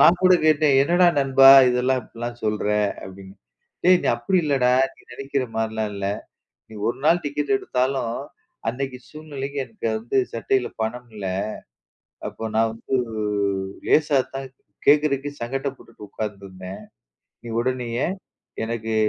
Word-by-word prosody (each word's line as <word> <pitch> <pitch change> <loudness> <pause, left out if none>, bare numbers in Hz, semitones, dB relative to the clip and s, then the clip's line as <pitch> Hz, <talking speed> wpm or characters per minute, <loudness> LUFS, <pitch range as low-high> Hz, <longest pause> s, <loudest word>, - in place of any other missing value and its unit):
நான் 175 +1 +6
கூட 185 0 +7
கேட்டேன். 155 -2 +4
"என்னடா 175 +4 +4
நண்பா 135 -1 +6 0.2
இதெல்லாம் 125 +1 +1
இப்புட்லாம் 120 +1 -7
சொல்ற" 105 -1 -1 0.4
அப்படின்னு. 95 0 -11 0.5
டேய் 180 0 +6
நீ - - -2
அப்டி 190 -1 0
இல்லடா, 130 -4 +2 0.2
நீ - - -22
நெனைக்கிற 135 0 -2
மாரிலாம் 110 -1 -1
இல்ல, 100 0 -3 0.6
நீ - - -13
ஒரு 120 - -1
நாள் 170 +2 +4
டிக்கெட் 145 -1 -1
எடுத்தாலும், 125 -2 -1 0.5
அன்னைக்கு 130 +1 -4
சூழ்நிலைக்கு 145 -2 -7
என்ட்ட 165 - -6
வந்து 120 +4 -2 0.2
சட்டைல 125 +2 0
பணம் 120 +2 -3
இல்ல, 100 - -6 1.0
அப்போ - - -11
நான் 115 0 +3
வந்து 130 +3 -2 0.9
லேசா 150 -3 +4 0.2
தான் 135 -1 -5 0.4
கேட்கறதுக்கு 145 -1 +3
சங்கட்டப்பட்டுட்டு 135 -1 -5
உக்காந்துருந்தேன். 95 -3 -7 0.6
நீ 120 - -9
உடனேயே 125 0 -1 0.6
எனக்கு 115 -1 -3
130 Hz, 125 wpm, -23 LUFS, 115-140 Hz, 1.0 s, கூட